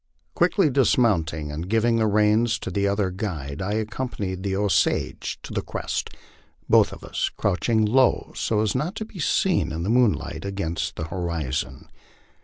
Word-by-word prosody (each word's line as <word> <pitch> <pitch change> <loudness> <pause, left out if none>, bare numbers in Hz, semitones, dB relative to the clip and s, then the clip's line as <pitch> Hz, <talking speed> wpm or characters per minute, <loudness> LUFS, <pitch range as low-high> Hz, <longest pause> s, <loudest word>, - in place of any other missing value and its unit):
Quickly 180 -8 +3
dismounting 95 - +2
and 80 +5 -5
giving 115 +1 +2
the 110 -1 +2
reins 105 +2 +3
to - - -6
the 100 0 +1
other 100 -1 0
guide, 85 -8 -4
I 100 +2 -2
accompanied 105 -4 -3
the 95 0 -1
Osage 100 0 0
to - - -8
the - - 0
crest, - - -3 0.6
both - - +5
of - - -10
us - - -2
crouching 110 +3 +1
low 130 +4 +2
so 105 -2 0
as 110 -2 +1
not 150 - -2
to 220 - -4
be 215 -4 -12
seen 155 - +1
in 80 +1 -3
the 100 - 0
moonlight 115 - +1
against 85 -5 -3
the - - -4
horizon. 85 -7 -3
105 Hz, 165 wpm, -24 LUFS, 85-115 Hz, 0.6 s, both